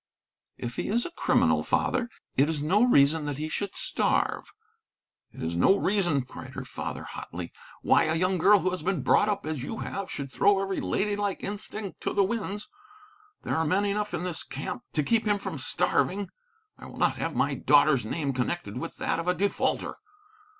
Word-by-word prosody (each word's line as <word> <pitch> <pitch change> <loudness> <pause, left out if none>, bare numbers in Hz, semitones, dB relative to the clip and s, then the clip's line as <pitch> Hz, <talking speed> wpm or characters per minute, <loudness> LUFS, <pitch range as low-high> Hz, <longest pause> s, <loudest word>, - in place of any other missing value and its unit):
"If 120 0 -5
he - - -2
is 235 +4 +1
a 350 - -5
criminal, - - +2
father, 245 -2 0 0.3
it 140 +4 +4
is 160 -2 -1
no 175 +9 +2
reason 150 - +4
that 145 -2 -3
he 155 +1 -3
should 200 +5 -3
starve." - - 0 0.8
"It - - -9
is 80 +1 -2
no 190 - +5
reason," 175 -11 +1
cried - - -10
her - - -5
father, - - -5
hotly, 85 0 -7 0.3
"why - - +4
a 160 - +1
young 185 +2 +1
girl 200 +3 +6
who 185 +2 +1
has 185 - -3
been 175 -4 -1
brought 210 - +4
up 200 -1 -1
as 155 -4 -3
you 180 - -5
have, 195 0 -4
should 140 -1 -5
throw 200 +7 +4
every 195 0 -2
lady 205 0 0
like 205 -1 -2
instinct 205 0 -5
to - - -2
the 200 - +4
winds. 205 -1 -3 0.8
There - - -1
are 160 - +2
men 185 +6 +2
enough 210 +1 -1
in - - -3
this 180 -3 -1
camp 130 -2 -5
to 150 - +1
keep 225 +7 +2
him 205 -1 +3
from 195 -7 -5
starving. 180 +6 0 0.5
I - - -10
will - - -11
not - - +2
have - - -3
my - - +1
daughter's 145 -4 +4
name 140 +5 -2
connected 130 +8 -2
with 165 - -6
that - - -1
of 165 - -4
a 180 - +3
defaulter. 200 +2 0
180 Hz, 200 wpm, -27 LUFS, 145-205 Hz, 0.8 s, girl